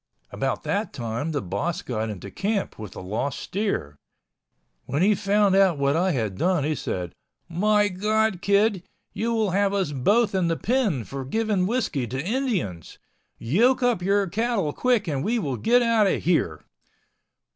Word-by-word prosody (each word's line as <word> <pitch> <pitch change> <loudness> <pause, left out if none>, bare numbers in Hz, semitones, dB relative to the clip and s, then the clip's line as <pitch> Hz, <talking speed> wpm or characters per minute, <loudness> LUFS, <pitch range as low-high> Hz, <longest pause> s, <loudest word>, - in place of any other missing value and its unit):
About - - -2
that - - -2
time 120 +7 -3
the 145 -4 -2
boss 100 - -3
got 110 -3 -3
into 100 -1 -7
camp 200 - -2
with 105 -3 -8
the - - -8
lost 115 +8 -2
steer. 185 - -3 0.9
When 145 +5 0
he 210 +2 +5
found 200 0 +2
out 190 -5 +4
what 140 +1 +1
I 180 +3 +2
had 110 - -2
done 180 -4 +2
he 155 +2 0
said, 90 - -4 0.3
"My 205 +4 +2
God, 210 0 0
kid, 200 -1 +2 0.3
you 230 +2 -1
will 220 -4 +1
have 200 +1 +1
us 190 -6 0
both 205 - +2
in 185 -3 +1
the 165 -1 0
pen 215 - 0
for 135 +5 -6
giving 205 +5 0
whiskey 200 - -1
to 130 +3 -4
Indians. 200 - -2 0.4
Yoke 235 - +2
up 240 -7 +2
your 200 +2 +2
cattle 200 -5 -1
quick 245 -6 +1
and 140 -3 -1
we 235 +3 0
will 145 - -2
get 245 - +3
out 230 -3 +3
of - - 0
here." 85 - 0
185 Hz, 170 wpm, -24 LUFS, 135-215 Hz, 0.9 s, he